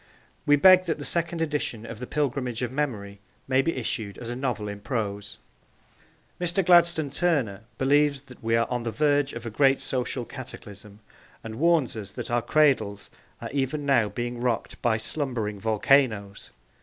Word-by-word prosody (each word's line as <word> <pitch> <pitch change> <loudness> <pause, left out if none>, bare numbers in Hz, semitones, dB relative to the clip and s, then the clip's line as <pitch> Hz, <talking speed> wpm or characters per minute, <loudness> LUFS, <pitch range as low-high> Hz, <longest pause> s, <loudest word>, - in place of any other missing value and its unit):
We 145 - +6
beg 185 +5 +7
that 165 - -1
the 145 - -5
second 170 -1 0
edition 145 -7 -3
of 115 -1 -8
The 125 - -6
Pilgrimage 130 -4 -2
of 125 - -2
Memory 110 -8 -3 0.3
may 130 0 +3
be 165 +4 -1
issued 110 -4 -3
as 120 -1 -6
a - - -4
novel 125 -5 -2
in 100 0 -6
prose. 105 -4 -4 1.0
Mr. 175 +1 0
Gladstone 170 -4 +4
Turner 135 - 0
believes 140 0 +2
that 130 -4 -15
we 115 0 +1
are 115 0 +2
on 125 -1 -2
the 115 - -3
verge 145 +4 +1
of 115 0 -7
a 115 - -4
great 135 +3 +3
social 130 -2 -2
cataclysm, 105 -5 -10 0.4
and 110 +1 -7
warns 165 -6 +2
us 105 -3 -7
that 120 -2 -6
our 120 0 +2
cradles 135 -9 +1 0.3
are - - -6
even 140 +1 -2
now 120 -7 +3
being 120 +3 -4
rocked 120 -2 -2
by 115 -2 +2
slumbering 110 -4 -3
volcanoes! 110 -2 +1
125 Hz, 170 wpm, -26 LUFS, 110-145 Hz, 1.0 s, beg